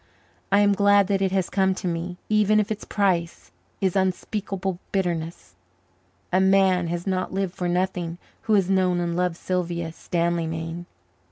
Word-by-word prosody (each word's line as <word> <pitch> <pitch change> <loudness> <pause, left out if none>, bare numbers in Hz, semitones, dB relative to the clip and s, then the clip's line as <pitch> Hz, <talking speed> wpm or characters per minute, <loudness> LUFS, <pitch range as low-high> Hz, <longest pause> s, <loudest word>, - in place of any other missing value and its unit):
I 200 +1 +5
am 205 0 +4
glad 200 0 +4
that 195 -1 +1
it 190 -1 +1
has 190 -2 +1
come 190 -1 +1
to 185 - -4
me, 175 +1 -3
even 215 0 +3
if 210 0 -1
its 215 - -4
price 180 - -1 0.3
is 190 -2 +1
unspeakable 190 0 -2
bitterness. 170 - -2 0.8
A 185 - +4
man 190 -2 +3
has 170 +1 -3
not 185 -1 -2
lived 195 -2 -1
for 180 - -3
nothing 175 -1 -1 0.3
who 220 - +2
has 195 -3 +3
known 185 -2 +2
and 170 -1 -1
loved 180 -1 0
Sylvia 170 -3 -2
Stanleymain. 165 0 -2
185 Hz, 160 wpm, -24 LUFS, 170-195 Hz, 0.8 s, I